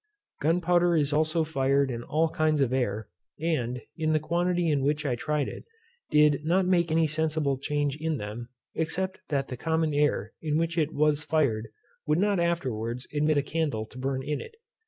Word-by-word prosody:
Gunpowder 175 +2 +3
is 145 -2 +1
also 155 +2 +2
fired 140 -3 +1
in 120 -1 -4
all 155 +6 +1
kinds 155 -1 +1
of 130 -2 +2
air, 110 -5 -1 0.3
and, 125 -7 -1
in 155 -1 0
the 155 - +3
quantity 175 +2 +1
in 145 -2 +1
which 150 +2 0
I 135 - +1
tried 150 +3 -1
it, - - -7 0.5
did 150 -1 +4
not 180 +4 +2
make 170 -3 +2
any 160 0 +3
sensible 155 -3 0
change 145 0 -1
in 160 0 -1
them, 115 +2 -6 0.2
except 185 +4 -2
that 135 -2 -1
the 125 - -5
common 160 +2 0
air 145 0 +1
in 155 -1 0
which 165 0 0
it 160 -3 +1
was 150 0 +2
fired 125 -10 +1 0.4
would 150 +1 +3
not 200 0 +2
afterwards 125 -8 -1
admit 150 0 +2
a 140 - +2
candle 145 -8 -1
to 125 - -12
burn 130 0 -2
in 150 +2 -2
it. 450 - -11
150 Hz, 185 wpm, -27 LUFS, 135-160 Hz, 0.5 s, did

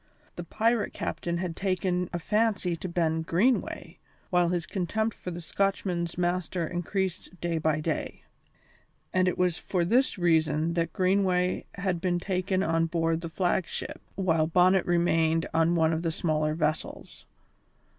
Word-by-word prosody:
The - - -5
pirate 225 -1 0
captain 170 0 -3
had 175 -2 -3
taken 185 -2 -1
a - - -2
fancy 205 -1 +1
to 180 +3 -6
Ben 165 -2 0
Greenway, 190 +10 0 0.3
while 175 -1 +3
his 175 -1 -1
contempt 220 +4 -1
for - - -7
the 175 0 -6
Scotchman's 175 -2 -1
master 175 -1 -1
increased 180 +1 -3
day 170 -2 -1
by 155 -1 +1
day; - - -3 0.9
and 185 0 +3
it 180 - 0
was 180 -2 +1
for 180 -3 -1
this 245 +7 +2
reason 160 -2 +2
that 170 -1 0
Greenway 185 -1 +1
had 185 -3 -1
been 175 -1 +1
taken 185 +1 -1
on 165 -1 +1
board 165 0 0
the 165 - -5
flag 175 +1 0
ship, - - -6
while 165 -5 +2
Bonnet 180 +2 +4
remained 165 -2 +2
on 165 +1 +3
one 160 -1 +3
of 160 - -1
the 165 -1 -1
smaller 155 -1 0
vessels. 155 -1 -3
175 Hz, 155 wpm, -28 LUFS, 165-185 Hz, 0.9 s, Bonnet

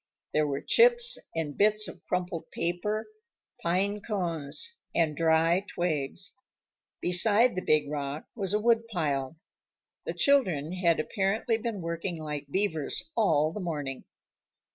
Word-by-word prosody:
There 155 0 +2
were 140 -1 -3
chips 480 0 +5 0.2
and 155 -3 -3
bits 215 +1 +3
of - - -10
crumpled 180 -2 -3
paper, 175 +6 -2 0.6
pine 195 +4 0
cones, 180 - -2 0.2
and 160 -3 +1
dry 165 +3 +2
twigs. 155 -6 -3 0.7
Beside 210 +7 +5
the 185 - -3
big 155 -3 +2
rock 145 0 -4
was 195 -5 -1
a 210 - +2
woodpile. 175 - 0 0.7
The - - -3
children 185 - +2
had 180 -3 +1
apparently 215 +6 0
been 225 -4 -4
working 170 +1 -4
like 150 -2 -5
beavers 160 -4 -1
all 155 -8 +2
the - - -5
morning. 145 -7 -4
175 Hz, 125 wpm, -28 LUFS, 155-210 Hz, 0.7 s, chips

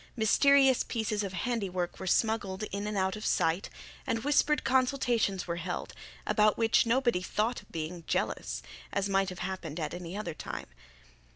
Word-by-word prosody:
Mysterious 270 +3 +5
pieces 220 -2 -1
of 195 -2 -4
handiwork 185 -4 -2
were 190 - -5
smuggled 210 -1 +1
in 200 +1 -3
and 210 -1 -2
out 190 +1 +1
of 215 - -7
sight, 165 -1 +1 0.4
and 225 - -1
whispered 295 +1 +3
consultations 245 -6 +1
were 170 -1 -3
held, 175 +1 -4 0.3
about 215 -1 +3
which 225 0 +3
nobody 240 -5 +2
thought 215 +6 -1
of - - -23
being 165 +1 -5
jealous, - - -1 0.3
as 200 0 0
might 195 -1 +2
have 180 - -7
happened 175 -4 -5
at 155 - -3
any 175 +2 -6
other 175 -6 -4
time. - - -6
205 Hz, 165 wpm, -30 LUFS, 185-235 Hz, 0.4 s, Mysterious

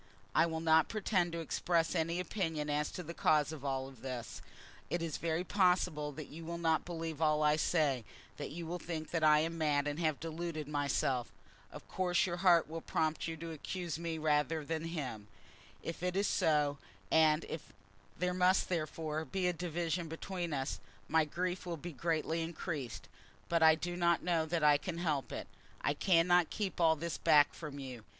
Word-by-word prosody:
I 170 - +4
will 160 -1 -3
not 160 -1 +4
pretend 190 -5 +1
to 170 - -2
express 165 +1 0
any 165 0 0
opinion 160 -5 -2
as 150 0 0
to 180 - -5
the 170 +1 -7
cause 155 -2 +3
of 155 -4 -8
all 135 -1 -2
this. 125 -2 -6 0.5
It 175 - 0
is 165 -3 -3
very 165 +1 -1
possible 180 -6 +2
that 155 +1 -7
you 165 +4 -10
will 170 +1 -4
not 160 -2 +1
believe 165 -3 -5
all 155 -1 +3
I 150 0 +5
say, 150 -6 +1 0.3
that - - -5
you 165 +4 -6
will 175 +2 -4
think 160 -2 -5
that 165 -2 0
I 150 -1 +6
am 165 +1 -2
mad 145 -2 +2
and 145 +2 -2
have 155 -4 0
deluded 165 -1 -4
myself. 140 -4 0 0.4
Of - - -11
course 180 +1 +1
your 175 -2 -2
heart 175 -2 +5
will 165 +1 -5
prompt 160 0 -1
you 165 0 -4
to 165 +1 -6
accuse 165 +1 -4
me 165 -1 -3
rather 150 0 +1
than 160 +1 -2
him. 130 -11 -4 0.6
If 165 - -5
it 180 0 -1
is 200 +1 +2
so, 150 -6 +2 0.3
and 160 0 +4
if 160 - -7 0.5
there 180 +1 0
must 185 +1 +3
therefore 155 -2 -2
be 180 +5 -2
a 180 - +2
division 170 0 -2
between 170 +1 -4
us, 135 -1 -2 0.3
my 160 0 +3
grief 180 +3 -3
will 170 -1 -3
be 170 +2 -7
greatly 165 +2 -1
increased; 160 - -5 0.4
but 170 -1 +2
I 160 0 +8
do 175 +2 -4
not 170 -1 +2
know 165 -2 +1
that 165 -1 -1
I 145 -1 +6
can 175 0 -4
help 155 -6 -1
it. - - -4 0.3
I - - +1
cannot 175 -1 +4
keep 195 -4 -3
all 160 -1 +5
this 170 +2 -4
back 145 -1 +5
from 150 -3 -7
you. 130 -5 -7
160 Hz, 190 wpm, -34 LUFS, 150-175 Hz, 0.6 s, I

